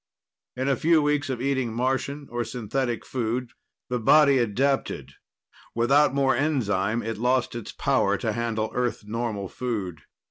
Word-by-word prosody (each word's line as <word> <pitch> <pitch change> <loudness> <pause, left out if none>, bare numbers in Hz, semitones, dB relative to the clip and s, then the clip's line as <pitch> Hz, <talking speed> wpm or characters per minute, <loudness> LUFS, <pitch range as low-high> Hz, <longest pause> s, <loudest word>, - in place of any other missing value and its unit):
In 130 +1 -2
a 140 - +3
few 165 +4 +3
weeks 145 -1 +1
of 130 -3 -2
eating 130 -4 0
Martian 135 +3 -1
or 120 0 -1
synthetic 120 +1 -3
food, 120 0 -2 0.4
the 125 0 -1
body 140 +3 +5
adapted; 130 +5 0 0.6
without 135 +5 +4
more 135 -2 +2
enzyme, 115 -6 0
it 115 -1 -4
lost 125 +1 +1
its 120 -3 -6
power - - +1
to - - -2
handle 115 -2 -2
Earth 125 -3 -1
normal 110 -2 -3
food. 95 - -4
125 Hz, 145 wpm, -25 LUFS, 115-135 Hz, 0.6 s, body